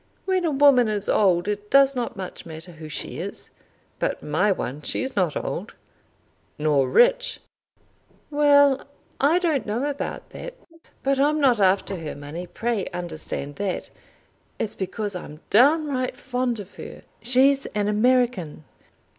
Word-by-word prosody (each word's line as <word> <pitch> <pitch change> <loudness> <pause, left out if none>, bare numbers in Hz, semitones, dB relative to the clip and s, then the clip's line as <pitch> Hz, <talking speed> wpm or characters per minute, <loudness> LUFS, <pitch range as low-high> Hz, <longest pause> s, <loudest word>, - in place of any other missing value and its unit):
When 375 -2 +1
a - - +2
woman 275 -4 +5
is 210 -1 -2
old 180 -3 +3
it 210 0 -3
does 275 0 +5
not 240 -4 -3
much 185 -1 -7
matter 160 +2 -9
who 160 -2 -10
she 150 - -4
is. - - -7 0.5
But - - -2
my 180 +8 +1
one! 145 -6 -3
She's 260 - -2
not 180 -6 +1
old!" - - -5 0.8
"Nor 145 -4 +2
rich?" - - +3 0.9
"Well; 285 -2 +5 0.4
I 295 +5 +4
don't 325 -9 0
know 230 +6 -1
about 285 -1 -5
that. - - -8 0.5
But 275 0 +1
I'm 300 +2 +3
not 255 -6 +4
after 195 0 +2
her 160 -3 -6
money. 145 +5 -7
Pray 225 -2 -2
understand 160 -5 -5
that. 195 -2 -3 0.7
It's 210 - -2
because 200 +2 -3
I'm 155 -4 -8
downright 275 +1 +3
fond 250 -3 -2
of 200 -1 -11
her. - - -9 0.2
She's 265 +4 +3
an 205 -1 -2
American." 215 -8 +1
215 Hz, 145 wpm, -24 LUFS, 180-275 Hz, 0.9 s, woman